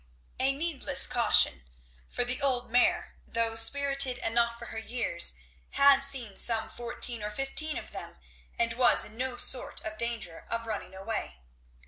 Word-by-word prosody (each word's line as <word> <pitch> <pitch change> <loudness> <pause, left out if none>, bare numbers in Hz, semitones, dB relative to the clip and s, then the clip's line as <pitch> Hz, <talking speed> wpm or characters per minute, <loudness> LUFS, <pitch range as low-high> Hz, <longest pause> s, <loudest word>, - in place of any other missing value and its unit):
A 265 +1 +2
needless 280 -2 -1
caution. 235 - +4 0.5
For 245 - -2
the 250 +1 0
old 255 -4 0
mare, 245 +1 +1
though 230 -1 -1
spirited 275 +2 +2
enough 235 +1 +1
for 235 -1 -8
her 225 - -4
years, 220 - -1 0.4
had 280 -1 +6
seen 265 -7 -5
some 225 -2 0
fourteen 240 -1 0
or 210 - -3
fifteen 270 +7 +1
of - - -8
them - - -8 0.4
and 230 -1 0
was 240 +1 +4
in 215 - -12
no 255 +1 -2
sort 255 - 0
of 215 0 -7
danger 225 -8 -3
of 230 0 -3
running 205 -4 -6
away. 190 - -5
235 Hz, 155 wpm, -29 LUFS, 225-265 Hz, 0.5 s, had